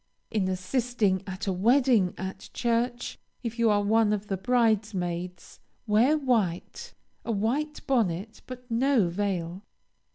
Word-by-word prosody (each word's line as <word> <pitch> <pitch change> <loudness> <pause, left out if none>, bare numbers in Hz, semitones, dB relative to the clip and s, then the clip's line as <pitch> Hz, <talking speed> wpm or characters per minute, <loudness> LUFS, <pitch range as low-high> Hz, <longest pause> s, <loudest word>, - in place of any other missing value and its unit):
In 205 -4 0
assisting 195 +1 0
at 190 0 -5
a 195 - 0
wedding 230 -1 +3
at 190 +1 -6
church, 240 +1 -1 0.2
if 230 0 -4
you 230 -1 +4
are 205 -1 +3
one 215 0 +3
of 210 0 -4
the 195 - 0
bridesmaids, 190 -6 -1 0.3
wear 235 +8 +4
white, 225 - -1 0.3
a 235 - -2
white 255 +9 -1
bonnet 215 -4 0
but 250 -1 -8
no 235 -5 +3
veil. 180 -1 -2
215 Hz, 130 wpm, -27 LUFS, 190-240 Hz, 0.3 s, you